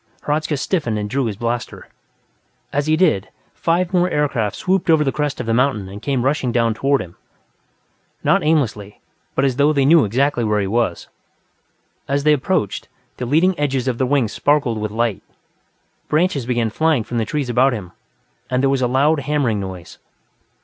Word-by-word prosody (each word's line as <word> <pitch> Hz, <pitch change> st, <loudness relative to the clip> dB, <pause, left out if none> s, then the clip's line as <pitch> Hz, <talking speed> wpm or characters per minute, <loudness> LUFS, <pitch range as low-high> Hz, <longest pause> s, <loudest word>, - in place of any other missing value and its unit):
Hradzka 150 Hz, 0 st, -1 dB
stiffened 135 Hz, -, -1 dB
and 105 Hz, 0 st, -3 dB
drew 130 Hz, +4 st, -1 dB
his 110 Hz, -3 st, -3 dB
blaster; 120 Hz, +1 st, -4 dB, 0.9 s
as 145 Hz, +1 st, 0 dB
he 155 Hz, 0 st, +3 dB
did, 155 Hz, -, +2 dB, 0.2 s
five 175 Hz, +2 st, 0 dB
more 180 Hz, 0 st, +3 dB
aircraft 135 Hz, -, 0 dB
swooped 185 Hz, -1 st, 0 dB
over 160 Hz, -2 st, +5 dB
the 135 Hz, -, 0 dB
crest 150 Hz, -1 st, -2 dB
of 125 Hz, -, -3 dB
the 115 Hz, -, 0 dB
mountain 120 Hz, -5 st, +1 dB
and 100 Hz, +2 st, -9 dB
came 135 Hz, -3 st, -1 dB
rushing 135 Hz, -3 st, 0 dB
down 115 Hz, -1 st, +1 dB
toward 135 Hz, +4 st, +1 dB
him; 85 Hz, -1 st, -15 dB, 1.1 s
not -, -, +3 dB
aimlessly, 115 Hz, -10 st, 0 dB, 0.4 s
but 135 Hz, -, +2 dB
as 130 Hz, -2 st, 0 dB
though 145 Hz, +2 st, +4 dB
they 140 Hz, -3 st, +2 dB
knew 160 Hz, +1 st, +6 dB
exactly 125 Hz, +4 st, +1 dB
where 105 Hz, -1 st, +1 dB
he 100 Hz, -, 0 dB
was. 105 Hz, -3 st, -1 dB, 1.0 s
As 140 Hz, 0 st, 0 dB
they 150 Hz, 0 st, +5 dB
approached, 150 Hz, -, -1 dB, 0.3 s
the 125 Hz, -, -4 dB
leading 165 Hz, +8 st, +3 dB
edges 135 Hz, -3 st, -1 dB
of 125 Hz, -2 st, -1 dB
their 130 Hz, -, +1 dB
wings 130 Hz, -5 st, +1 dB
sparkled 140 Hz, -3 st, +1 dB
with 105 Hz, -, -2 dB
light, 115 Hz, -2 st, -1 dB, 0.9 s
branches 155 Hz, -6 st, 0 dB
began 120 Hz, -3 st, 0 dB
flying 155 Hz, -2 st, +1 dB
from 120 Hz, +2 st, -3 dB
the -, -, +1 dB
trees 140 Hz, +5 st, -2 dB
about 125 Hz, +3 st, +3 dB
him, 100 Hz, -7 st, -6 dB, 0.6 s
and 125 Hz, +1 st, 0 dB
there 135 Hz, -, +3 dB
was 135 Hz, -1 st, 0 dB
a 125 Hz, -, +2 dB
loud 145 Hz, +5 st, +2 dB
hammering 140 Hz, -6 st, 0 dB
noise. 95 Hz, -3 st, -8 dB
130 Hz, 185 wpm, -19 LUFS, 115-150 Hz, 1.1 s, knew